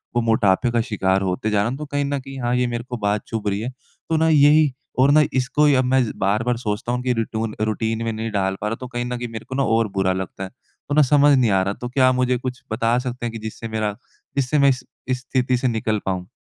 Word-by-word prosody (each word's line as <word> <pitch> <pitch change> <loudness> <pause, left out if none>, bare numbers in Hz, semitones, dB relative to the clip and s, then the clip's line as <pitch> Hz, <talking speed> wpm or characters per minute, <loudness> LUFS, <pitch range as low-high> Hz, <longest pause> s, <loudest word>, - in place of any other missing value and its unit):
वो 120 - +3
मोटापे 110 0 +2
का 115 -1 +2
शिकार 95 -4 0
होते 95 +3 -1
जा 105 - +1
रहा 110 - 0
हूँ, 130 - -4
तो 150 - -6
कहीं 145 -1 -1
न 140 0 -1
कहीं, 135 0 -9
हाँ, 120 0 0
ये 125 0 +1
मेरे 120 0 -3
को 125 - -3
बात 105 -1 -1
चुभ 110 -2 -4
रही 100 0 0
है। 120 - -3 0.4
तो 160 - +2
ना 160 +1 +3
यही 150 0 +5 0.3
और 135 +2 +5
ना 155 - +6
इसको 130 +3 +2
ही 145 -2 +5
अब 130 0 +2
मैं 130 0 +3 0.2
बार-बार 110 +5 +1
सोचता 110 0 -3
हूँ 125 0 -1
कि 125 -1 +1
रिटून 115 -1 -3
रूटीन 110 +1 -1
में 115 - 0
नहीं 110 0 -4
डाल 95 -2 0
पा 105 - -1
रहा, 115 - -1
तो 125 +2 -8
कहीं 120 -1 -4
न 125 0 -3
कहीं 120 - -4
मेरे 110 -1 -7
को 130 - -4
ना 135 - +1
और 115 -2 +2
बुरा 95 -1 +2
लगता 95 +1 -5
है। 95 - -6
तो 145 +3 -9
ना 155 - +6
समझ 145 0 +5
नहीं 120 -4 +3
आ 95 -1 +3
रहा, 100 +1 -1
तो 120 +4 -7
क्या 130 +1 +3
आप 130 - +1
मुझे 125 0 +1
कुछ 125 0 -6
बता 115 +2 +1
सकते 125 -1 -4
हैं 115 - -2
कि 115 - -6
जिससे 115 +1 -7
मेरा 110 -2 -2 0.4
जिससे 140 +2 +1
मैं 140 0 +6
इस 125 -2 -1 0.2
इस 130 -1 -1
स्थिति 130 -1 0
से 130 +1 0
निकल 110 -2 0
पाऊँ? 90 -1 -2
120 Hz, 280 wpm, -22 LUFS, 110-130 Hz, 0.4 s, ना